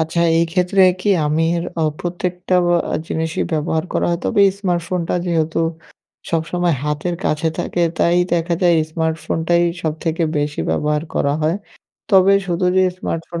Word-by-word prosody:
আচ্ছা, 160 +1 -1 0.2
এই 165 - +4
ক্ষেত্রে 180 +2 +3 0.2
কি 205 - -2 0.2
আমার 165 +3 +1 0.2
অ - - +2 0.2
প্রত্যেকটা 180 +1 -2 0.4
অ - - 0
জিনিসই 160 0 -2
ব্যবহার 160 +1 0
করা - - 0
হয়। 170 - 0
তবে 200 - +3 0.2
স্মার্টফোনটা 175 -2 -1
যেহেতু 165 -1 0 0.7
সবসময় 170 0 0
হাতের 150 +4 -2
কাছে 155 +2 0
থাকে, 175 0 -1 0.2
তাই 170 +1 +3 0.2
দেখা 170 0 0
যায় 175 -1 +5 0.2
স্মার্টফোনটাই 160 +1 0 0.2
সবথেকে 160 +1 -2 0.2
বেশি 145 0 -2
ব্যবহার 150 0 0
করা 140 - +1
হয়। 160 +4 +1 0.5
তবে 195 0 +6
শুধু 180 0 0
যে 190 - +5
স্মার্টফোন 165 0 -4
170 Hz, 145 wpm, -19 LUFS, 160-175 Hz, 0.7 s, তবে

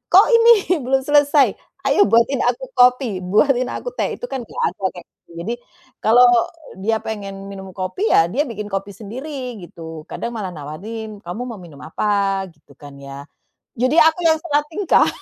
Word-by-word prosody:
"Kok 385 +3 +8
ini 460 +1 +6 0.3
belum 265 +1 +2
selesai? 290 -3 +4 0.4
Ayo 275 +1 +2
buatin 235 +4 +3
aku 250 +2 -2
kopi, 250 -5 +3
buatin 245 +7 +2
aku - - -5
teh." - - -1
Itu - - -10
kan 265 - -2
nggak - - -5
ada, - - -23
kayak 175 - -11 0.2
gitu. - - -23
Jadi, 230 - -2 0.5
kalau 240 +3 +6 0.6
dia 220 +3 +1
pengen 195 -2 -6
minum 190 -1 -8
kopi 195 - -2
ya, 165 - +5
dia 285 +5 +2
bikin 210 -2 -6
kopi 195 +1 -3
sendiri 250 +1 -7
gitu. 160 -2 -10
Kadang 235 - -4
malah 200 -4 -3
nawarin, 205 +9 -7
"Kamu 180 +8 -5
mau 230 -6 -7
minum 160 -5 -13
apa?" 195 +2 0
Gitu - - -22
kan 145 -1 -12
ya. 140 +1 -10 0.5
Jadi 255 +5 +2
aku 320 +2 +4
yang 320 - +5
salah 295 -3 +2
tingkah. 365 +3 +2
220 Hz, 175 wpm, -20 LUFS, 190-265 Hz, 0.6 s, Kok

